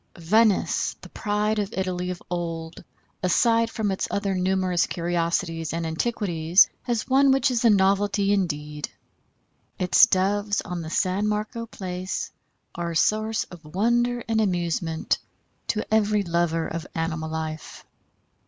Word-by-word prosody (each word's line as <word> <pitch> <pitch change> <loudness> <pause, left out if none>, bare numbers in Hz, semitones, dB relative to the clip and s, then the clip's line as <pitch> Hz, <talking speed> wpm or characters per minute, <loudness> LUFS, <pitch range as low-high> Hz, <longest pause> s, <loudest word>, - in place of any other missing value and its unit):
Venice, 210 +5 +2
the - - -11
pride 210 0 -1
of 205 0 -2
Italy 180 -1 -2
of 180 -1 -6
old, 165 -2 -4 0.4
aside 230 +5 +3
from 220 -3 -1
its 190 - -2
other 200 -1 -1
numerous 185 -1 +1
curiosities 170 -1 -1
and 165 0 -2
antiquities, 170 -1 +2
has 235 -3 -2
one 270 +1 +5
which 270 0 +3
is 240 -1 0
a 235 - +6
novelty 200 0 +3
indeed. 150 -6 -2 0.9
Its 185 +5 +6
Doves 205 +1 +1
on 180 -1 -5
the 160 - -6
San 190 +4 0
Marco 215 +2 -2
Place 185 -2 -5 0.4
are 170 0 -3
a 165 - -5
source 215 +6 +1
of 175 -2 -11
wonder 240 +8 +1
and 225 -1 +2
amusement 170 -4 -1 0.5
to 215 - -1
every 210 -1 +3
lover 170 -2 0
of 165 +1 -5
animal 165 -1 -2
life. 160 -1 -6
185 Hz, 135 wpm, -25 LUFS, 170-215 Hz, 0.9 s, a